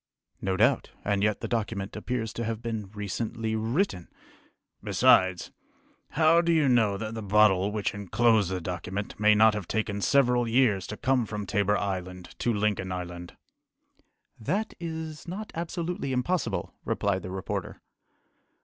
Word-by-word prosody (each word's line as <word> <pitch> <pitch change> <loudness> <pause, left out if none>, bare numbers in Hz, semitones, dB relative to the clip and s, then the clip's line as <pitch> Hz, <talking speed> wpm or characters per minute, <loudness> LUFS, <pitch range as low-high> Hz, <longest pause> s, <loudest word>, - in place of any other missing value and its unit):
"No 95 -1 -1
doubt, 120 +5 +3 0.2
and 100 -1 +1
yet 105 0 +1
the - - -3
document 105 -4 -3
appears 115 0 -3
to 115 - -3
have 115 -1 -3
been 110 -4 -4
recently 110 +2 -3
written!" 110 - -1 0.8
"Besides, 95 -1 +3 0.6
how 160 +2 +5
do 170 0 +1
you 155 -4 +3
know 110 -6 +3
that 110 +2 -5
the 115 - -5
bottle 100 -1 +4
which 105 -1 -1
enclosed 105 0 +2
the 95 -1 -2
document 90 +4 -5
may 105 0 +5
not 110 +1 +6
have 105 -5 -4
taken 105 -2 -2
several 125 -1 +3
years 115 -5 +2
to 105 - -6
come 130 -4 +1
from 105 -1 -4
Tabor 105 0 +1
Island 90 -2 -4
to 120 - +1
Lincoln 105 -3 0
Island?" 90 -1 -6 1.0
"That 195 - -2
is 160 -1 -6
not 200 +5 -6
absolutely 170 -4 -3
impossible," 165 +8 -1
replied 100 -2 0
the 90 - -7
reporter. 95 0 -4
110 Hz, 150 wpm, -27 LUFS, 100-125 Hz, 1.0 s, not